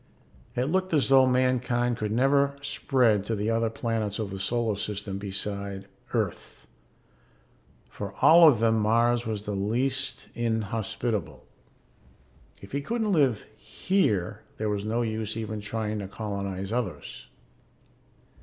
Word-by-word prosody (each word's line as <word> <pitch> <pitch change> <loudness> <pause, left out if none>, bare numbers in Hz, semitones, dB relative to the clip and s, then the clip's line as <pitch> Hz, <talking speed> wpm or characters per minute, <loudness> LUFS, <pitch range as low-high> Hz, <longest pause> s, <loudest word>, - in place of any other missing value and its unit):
It 125 - 0
had 135 +4 -1
looked 185 -2 +1
as 145 - +2
though 135 -1 +6
mankind 125 -1 +1
could 105 -2 -3
never 140 +4 +3
spread 120 -8 +2
to 115 - 0
the 105 +2 -1
other 115 0 +1
planets 110 -3 -2
of 105 -3 -4
the 95 - -5
solar 115 +1 0
system 100 -1 -4
besides 100 0 -4 0.3
Earth - - -3 1.2
for - - -6
of - - -17
all 165 0 +8
of 120 -7 +2
them 115 0 +3
Mars 115 +2 +2
was 105 -2 -3
the 105 - -4
least 120 +7 -1
inhospitable; 110 - -2 1.2
if 100 - -11
he 140 - -2
couldn't 220 +6 -1
live 135 - +2
here 105 - -1 0.2
there 110 0 -1
was 100 -1 -2
no 115 +3 0
use 110 -1 -3
even 110 -1 -4
trying 105 0 -3
to 100 - -5
colonize 100 -2 -4
the 120 - +1
others. 115 -7 -5
110 Hz, 145 wpm, -27 LUFS, 105-125 Hz, 1.2 s, all